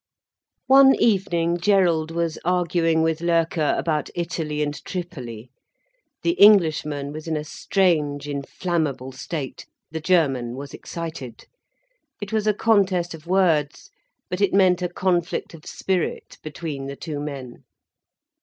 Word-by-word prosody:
One 270 +1 +7
evening 175 -5 +1
Gerald 175 -4 +2
was 165 -1 -2
arguing 170 -2 +1
with 160 0 0
Loerke 165 -2 +1
about 155 -4 -1
Italy 160 -3 -2
and 145 0 -2
Tripoli. 130 - -7 0.7
The 340 - +3
Englishman 155 -8 +4
was 155 +1 -8
in 160 -1 -1
a 150 - -3
strange, 150 -4 0
inflammable 145 -1 -3
state, 135 +1 -6 0.2
the 160 0 -4
German 135 -9 +1
was 140 +1 -8
excited. 160 -8 -7 0.7
It 205 0 -7
was 215 -1 0
a 215 - +4
contest 190 -6 +2
of 165 0 -12
words, 160 -7 +1 0.4
but 180 +2 -4
it 200 - +2
meant 185 -2 +4
a 180 - -1
conflict 175 -1 -1
of 160 -2 -13
spirit 185 -3 -3
between 150 -3 -6
the 140 - -6
two 150 0 -6
men. 140 -4 -7
165 Hz, 130 wpm, -23 LUFS, 145-180 Hz, 0.7 s, One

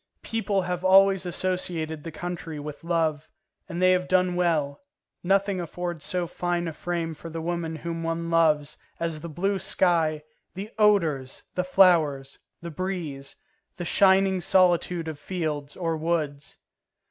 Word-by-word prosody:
People 215 -3 0
have 180 0 -3
always 195 0 +5
associated 175 -4 -2
the 165 - -6
country 165 -2 -6
with 150 +1 -8
love, 160 -3 0 0.4
and 170 -1 -4
they 185 0 +5
have 180 0 +1
done 185 -1 +2
well; 160 -5 0 0.4
nothing 195 0 +1
affords 175 -1 -5
so 180 -1 -1
fine 175 0 -2
a 165 - -4
frame 165 0 -3
for 165 +2 -9
the 165 0 -5
woman 165 -1 -3
whom 165 +1 -5
one 165 0 -2
loves 155 -3 +2 0.2
as 165 -2 -2
the 170 +2 -7
blue 195 +5 -1
sky, 160 -6 +1 0.3
the 200 +4 -6
odours, 165 -11 +2
the 180 - 0
flowers, 165 -8 +3 0.2
the 170 - -5
breeze, 160 -6 -5 0.4
the 175 - -4
shining 190 +1 +4
solitude 175 -2 +2
of 155 -2 -6
fields, 150 -4 -4
or 165 -2 -1
woods. 155 -3 -2
170 Hz, 145 wpm, -26 LUFS, 160-185 Hz, 0.4 s, always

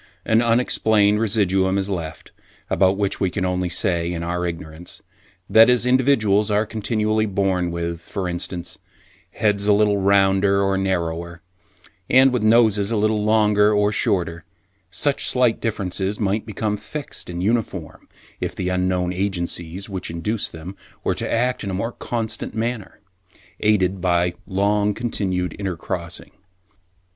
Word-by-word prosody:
An 110 +1 +3
unexplained 110 -3 +3
residuum 95 -3 +1
is 100 -1 -1
left, 85 -5 -5 0.4
about 95 0 +3
which 100 -1 0
we 95 - +1
can 95 +1 -2
only 90 0 -1
say, 85 -1 0
in 85 -1 -4
our 90 +1 -2
ignorance, 80 0 -7 0.4
that 110 +4 +7
as 125 -1 +3
individuals 120 -6 +3
are 105 +1 +2
continually 110 0 0
born 95 -3 0
with, 85 0 -4
for 95 +1 -4
instance, 90 0 -5 0.5
heads 105 -2 0
a 105 - +6
little 105 0 +3
rounder 100 0 +3
or 95 0 +1
narrower, 85 -3 -2 0.7
and 130 0 +5
with 125 - 0
noses 110 -2 +4
a 115 - 0
little 105 0 +1
longer 105 -1 +3
or 105 0 +2
shorter, 85 -6 0 0.5
such 140 +9 0
slight 125 -3 +2
differences 100 -2 -2
might 105 +1 -1
become 105 0 -2
fixed 145 +1 -7
and 90 0 -4
uniform, 115 +1 -2 0.3
if - - -4
the 90 - -2
unknown 90 -1 0
agencies 90 -1 -3
which 95 -3 -4
induced 100 +6 -2
them 85 +4 -9 0.3
were - - +1
to - - -3
act 125 +2 0
in 100 - -3
a 95 - -2
more 115 +5 -2
constant 115 -2 -4
manner, 115 -2 -4 0.6
aided 95 -3 +1
by 90 -1 +1
long 100 +2 +1
continued 95 -7 -2
intercrossing. 95 -4 -4
100 Hz, 145 wpm, -22 LUFS, 90-110 Hz, 0.7 s, that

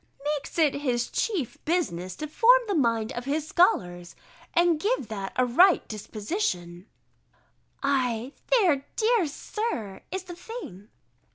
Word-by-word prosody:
_] - - -18
"makes 280 - -9
it 310 -4 +4
his 240 -4 -1
chief 360 - -2
business 185 - -1
to 305 - -5
form 465 +11 +6
the 405 - 0
mind 230 - +1
of 240 +1 -5
his 300 +2 -1
scholars, 175 - +1 0.4
and 340 -2 +3
give 410 - -1
that 195 -3 -4
a 255 - +3
right 345 +10 +4
disposition:" 205 - -4 1.0
[_Ay, 255 -2 0 0.2
there, 360 - +3
dear 445 -5 +2
Sir, 285 - -4
is 380 0 -3
the 360 -1 -9
thing! 340 - -9
280 Hz, 140 wpm, -26 LUFS, 220-360 Hz, 1.0 s, form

